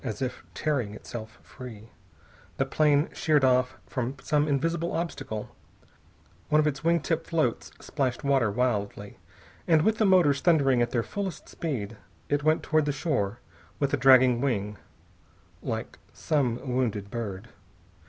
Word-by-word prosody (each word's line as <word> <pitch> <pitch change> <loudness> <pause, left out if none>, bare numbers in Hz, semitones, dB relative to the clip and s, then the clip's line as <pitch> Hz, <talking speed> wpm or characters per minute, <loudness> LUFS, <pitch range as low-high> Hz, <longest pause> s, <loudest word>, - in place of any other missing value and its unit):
As 110 -6 -4
if 130 -1 -4
tearing 130 -9 -1
itself 110 0 -8
free, 115 -4 -11 0.7
the - - +1
plane 150 -1 +2
sheered 150 -3 +2
off 130 0 +3
from 130 0 -3
some 150 -1 +1
invisible 165 +4 0
obstacle, 145 -10 -4 0.9
one 150 - +4
of 155 - +3
its 150 -1 -1
wing 170 +1 +3
tip 165 -1 -1
floats 155 -8 0
splashed 135 -2 -2
water 135 -6 +2
wildly, 105 -3 -2 0.5
and, 160 -2 +4
with 220 +1 +2
the 215 - +4
motors 170 -8 +4
thundering 140 -8 +3
at 120 - +1
their 120 -2 0
fullest 195 - -5
speed, 115 -10 -4 0.3
it 145 0 +1
went 155 +1 +2
toward 155 -1 +2
the 145 - +1
shore 135 - -1 0.4
with 140 -1 -1
a - - +3
dragging 130 -2 +6
wing, 105 -6 -1 0.8
like - - -5
some 140 -7 0
wounded 115 -6 -1
bird. 110 -2 -5
135 Hz, 145 wpm, -27 LUFS, 115-155 Hz, 0.9 s, dragging